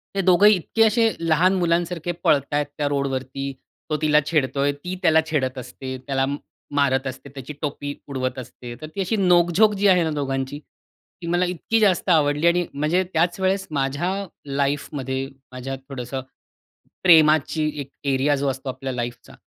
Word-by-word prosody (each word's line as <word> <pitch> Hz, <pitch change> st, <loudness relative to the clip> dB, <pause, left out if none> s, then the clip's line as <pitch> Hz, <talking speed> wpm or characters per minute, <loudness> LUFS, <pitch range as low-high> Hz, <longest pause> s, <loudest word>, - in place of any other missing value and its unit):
हे 195 Hz, -, +2 dB
दोघंही 190 Hz, +3 st, +6 dB
इतके 210 Hz, +5 st, +1 dB
असे 225 Hz, +1 st, +3 dB
लहान 165 Hz, +3 st, +3 dB
मुलांसारखे 170 Hz, 0 st, 0 dB
पळतायेत 145 Hz, +1 st, +2 dB
त्या 145 Hz, -1 st, 0 dB
रोडवरती, 135 Hz, -1 st, -2 dB, 0.4 s
तो 155 Hz, -, 0 dB
तिला 150 Hz, -1 st, +4 dB
छेडतोय, 145 Hz, -2 st, +1 dB
ती 180 Hz, +6 st, -6 dB
त्याला 160 Hz, 0 st, +5 dB
छेडत 130 Hz, -3 st, 0 dB
असते, 130 Hz, +1 st, -7 dB
त्याला 135 Hz, -1 st, +1 dB, 0.5 s
मारत 135 Hz, -2 st, +2 dB
असते, 130 Hz, +1 st, -7 dB
त्याची 135 Hz, +1 st, -8 dB
टोपी 145 Hz, -1 st, -3 dB
उडवत 130 Hz, -2 st, -3 dB
असते, 120 Hz, -1 st, -9 dB
तर 155 Hz, -, -6 dB
ती 200 Hz, -, -1 dB
अशी 190 Hz, +4 st, 0 dB
नोक-झोक 180 Hz, +2 st, +4 dB
जी 200 Hz, +1 st, +2 dB
आहे 180 Hz, -2 st, +5 dB
ना 160 Hz, -, -1 dB
दोघांची, 135 Hz, -1 st, -2 dB, 0.6 s
ती 170 Hz, -, -6 dB
मला 175 Hz, +1 st, +2 dB
इतकी 180 Hz, +5 st, -1 dB
जास्त 195 Hz, -3 st, +2 dB
आवडली 150 Hz, -1 st, +3 dB
आणि 175 Hz, +1 st, +3 dB
म्हणजे 155 Hz, +6 st, +1 dB
त्याच 170 Hz, +3 st, +1 dB
वेळेस 190 Hz, +1 st, 0 dB
माझ्या 140 Hz, +5 st, -1 dB, 0.3 s
लाईफमध्ये 140 Hz, -1 st, -2 dB, 0.2 s
माझ्या 130 Hz, +1 st, -5 dB
थोडंसं 130 Hz, 0 st, -5 dB, 0.8 s
प्रेमाची 155 Hz, -2 st, +5 dB
एक 140 Hz, -, -8 dB, 0.2 s
एरिया 140 Hz, +2 st, +2 dB
जो 140 Hz, 0 st, -1 dB
असतो 130 Hz, 0 st, -4 dB
आपल्या 130 Hz, 0 st, -4 dB
लाईफचा 120 Hz, -1 st, -6 dB
145 Hz, 155 wpm, -23 LUFS, 135-175 Hz, 0.8 s, दोघंही